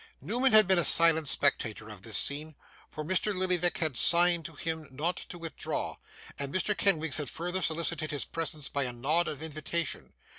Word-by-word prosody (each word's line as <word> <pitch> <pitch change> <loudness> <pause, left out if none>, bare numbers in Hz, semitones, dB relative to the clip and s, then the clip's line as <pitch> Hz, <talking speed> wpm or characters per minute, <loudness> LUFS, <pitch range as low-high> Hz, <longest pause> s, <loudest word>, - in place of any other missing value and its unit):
Newman 250 +5 -1
had 215 -3 +7
been 190 -2 +4
a - - +1
silent 160 -1 +5
spectator 115 -7 -1
of 105 -3 -12
this 110 0 +1
scene; 150 +2 +1 0.3
for 155 - -7
Mr. 185 +4 0
Lillyvick 180 -1 0
had 155 -5 -2
signed 170 +3 +5
to 165 - -9
him 160 0 -5
not 155 +7 -3
to 180 - -7
withdraw, 165 -3 -5 0.4
and 140 -1 -3
Mr. 195 +4 0
Kenwigs 160 -8 +2
had 150 -4 -4
further 180 +3 -4
solicited 165 -1 -2
his 145 -2 -3
presence 155 -3 -4
by 140 -1 -2
a 125 - -5
nod 150 +8 0
of 150 0 -6
invitation. 160 +1 -3
160 Hz, 185 wpm, -28 LUFS, 145-175 Hz, 0.4 s, had